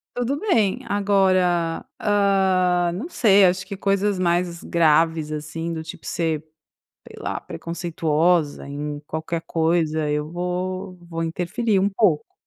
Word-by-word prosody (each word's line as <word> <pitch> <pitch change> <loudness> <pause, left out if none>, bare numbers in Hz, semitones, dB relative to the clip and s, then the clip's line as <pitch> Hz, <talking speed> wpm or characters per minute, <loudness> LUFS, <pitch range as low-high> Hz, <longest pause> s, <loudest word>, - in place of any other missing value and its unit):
Tudo 245 +3 -1
bem. 225 - +1
Agora, 185 -4 +2 0.2
ah, 190 -4 +2
não 215 - -5
sei, 200 - +5
acho 185 +1 0
que 200 - -6
coisas 200 0 +1
mais 175 -1 0
graves, 160 -1 +2
assim, 155 +2 -4
do 160 -1 -4
tipo 160 - -10
ser, 160 -2 -2 0.6
sei - - -12
lá, - - -3
preconceituosa 165 -2 0
em 145 +1 -4
qualquer 160 +2 -4
coisa, 160 -2 +1
eu 150 0 -1
vou 180 +2 -4
vou 165 -1 -5
interferir 185 +6 0
um 195 +1 +2
pouco. 195 -7 +1
175 Hz, 130 wpm, -23 LUFS, 160-195 Hz, 0.6 s, sei